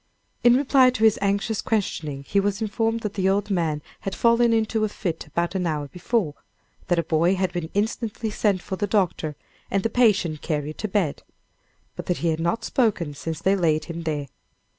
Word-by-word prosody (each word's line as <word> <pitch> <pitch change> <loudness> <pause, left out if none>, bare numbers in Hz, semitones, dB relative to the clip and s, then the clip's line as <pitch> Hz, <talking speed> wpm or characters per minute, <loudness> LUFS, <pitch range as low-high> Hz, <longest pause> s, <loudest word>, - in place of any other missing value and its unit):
In 240 0 +7
reply 270 -2 +5
to 245 -3 -2
his 220 -2 +5
anxious 200 +2 0
questioning, 155 -10 -2
he 200 - +2
was 200 0 0
informed 225 +1 -1
that 210 -2 -3
the 190 -2 +1
old 205 +1 0
man 160 -5 0 0.2
had 195 - -4
fallen 235 0 +4
into 220 -1 +1
a 215 - +1
fit 170 -6 -4
about 170 +4 -1
an 185 -2 -1
hour 150 -3 -2
before 180 - -1 0.5
that 175 - +2
a 170 - +2
boy 165 +4 +2
had 185 -1 -1
been 175 -3 -3
instantly 220 +1 -1
sent 200 -4 +1
for 190 - -4
the 205 - -1
doctor, 180 -7 0 0.3
and 195 0 0
the 225 - 0
patient 200 -10 +2
carried 150 0 -3
to 215 - -1
bed; 190 -7 0 0.7
but - - -7
that 180 - 0
he 170 - 0
had 160 0 0
not 170 +7 0
spoken 200 - +1
since 160 +2 -5
they 195 +1 +4
laid 160 -5 +1
him 170 -1 -6
there. 150 -3 -2
190 Hz, 200 wpm, -24 LUFS, 165-220 Hz, 0.7 s, In